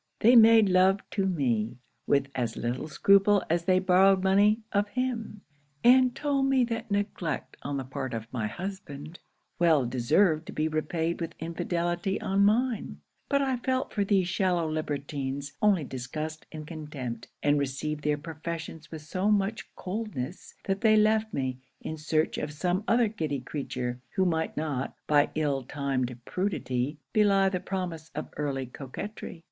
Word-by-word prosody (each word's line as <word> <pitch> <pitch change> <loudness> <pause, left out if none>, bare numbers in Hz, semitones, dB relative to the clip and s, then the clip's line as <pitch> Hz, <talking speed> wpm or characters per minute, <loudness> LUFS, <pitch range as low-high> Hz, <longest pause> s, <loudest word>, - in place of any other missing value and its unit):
They 240 +3 +7
made 225 -2 +8
love 190 +1 +3
to 195 -2 0
me, 120 - 0 0.3
with 140 -1 +3
as 120 -4 -2
little 120 +5 -2
scruple 200 +5 +4
as 170 0 +1
they 185 0 +4
borrowed 190 +1 +4
money 205 +3 +4
of 205 0 +1
him; 230 -3 -3 0.4
and 255 +1 +6
told 275 -1 +1
me 270 -2 +4
that 230 -1 -3
neglect 200 -7 -2
on 140 0 -3
the 135 - -3
part 130 -1 -4
of 110 -1 -4
my 115 -4 -1
husband, 165 - -7 0.4
well 160 -6 +4
deserved 155 +7 +2
to - - -7
be 155 +1 0
repaid 160 +2 -1
with 165 0 -4
infidelity 175 +3 -2
on 195 +1 +1
mine: 215 - +1 0.3
but 280 0 +3
I 265 -2 0
felt 260 +2 -1
for 205 - +1
these 195 -3 +2
shallow 180 -3 +1
libertines 140 -2 -3
only 200 -6 +4
disgust 155 +5 -6
and 155 -1 -7
contempt; 145 -7 -6 0.2
and 145 0 +3
received 145 +2 -3
their 150 0 +1
professions 160 +1 -6
with 160 -2 -8
so 185 +6 -1
much 205 +1 0
coldness, 185 - -5
that 195 0 -2
they 220 -2 +5
left 215 +1 +3
me, 130 -5 -2 0.2
in 160 - -5
search 155 0 0
of 150 - -3
some 180 +6 -1
other 235 0 +4
giddy 155 -10 -3
creature, 125 -2 -4
who 190 - +3
might 160 -2 -1
not, 145 -4 -2
by 145 -1 +4
ill 145 -3 0
timed 130 -2 -2
prudery, 140 -7 -2 0.2
belie 200 -2 +4
the 185 -1 -2
promise 180 -4 -4
of 155 - -5
early 140 -3 -2
coquetry. 145 - -7
165 Hz, 160 wpm, -28 LUFS, 145-200 Hz, 0.4 s, made